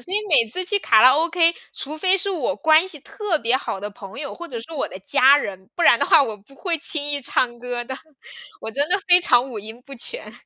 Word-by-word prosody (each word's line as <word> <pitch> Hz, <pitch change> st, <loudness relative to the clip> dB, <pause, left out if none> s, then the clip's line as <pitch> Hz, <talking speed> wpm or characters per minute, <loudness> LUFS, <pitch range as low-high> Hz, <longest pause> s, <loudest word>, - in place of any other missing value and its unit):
所 370 Hz, -, -5 dB
以 -, -, +2 dB
每 260 Hz, -9 st, +4 dB
次 365 Hz, +11 st, 0 dB
去 405 Hz, +3 st, 0 dB
卡 220 Hz, -, +3 dB
拉 255 Hz, +2 st, +7 dB
OK， 335 Hz, +1 st, +2 dB, 0.2 s
除 300 Hz, +3 st, -6 dB
非 375 Hz, +4 st, +3 dB
是 395 Hz, +1 st, -1 dB
我 290 Hz, -6 st, -2 dB
关 320 Hz, +2 st, +3 dB
系 315 Hz, -6 st, -6 dB
特 400 Hz, +1 st, -3 dB
别 245 Hz, -1 st, +1 dB
好 195 Hz, -7 st, -5 dB
的 205 Hz, -, -4 dB
朋 200 Hz, +2 st, -12 dB
友， 285 Hz, -, -6 dB
或 345 Hz, -, -9 dB
者 235 Hz, -7 st, -7 dB
是 285 Hz, +8 st, -12 dB
我 290 Hz, -, -2 dB
的 185 Hz, -, -10 dB
家 265 Hz, +8 st, +4 dB
人， 190 Hz, -8 st, -6 dB
不 345 Hz, -, -3 dB
然 235 Hz, -, +5 dB
的 -, -, +1 dB
话， 315 Hz, -3 st, +6 dB
我 220 Hz, -5 st, -4 dB
不 210 Hz, +7 st, -22 dB
会 345 Hz, +2 st, -2 dB
轻 300 Hz, -1 st, +1 dB
易 285 Hz, -1 st, -2 dB
唱 245 Hz, -2 st, -1 dB
歌 245 Hz, 0 st, -5 dB
的。 265 Hz, +2 st, -7 dB, 0.6 s
我 220 Hz, -, -6 dB
真 285 Hz, +5 st, -1 dB
的 370 Hz, -, +2 dB
非 355 Hz, 0 st, +6 dB
常 255 Hz, -5 st, +2 dB
五 225 Hz, -, -6 dB
音 220 Hz, +4 st, -9 dB
不 275 Hz, -, -11 dB
全。 470 Hz, -, -6 dB
280 Hz, 280 characters per minute, -21 LUFS, 240-335 Hz, 0.6 s, 拉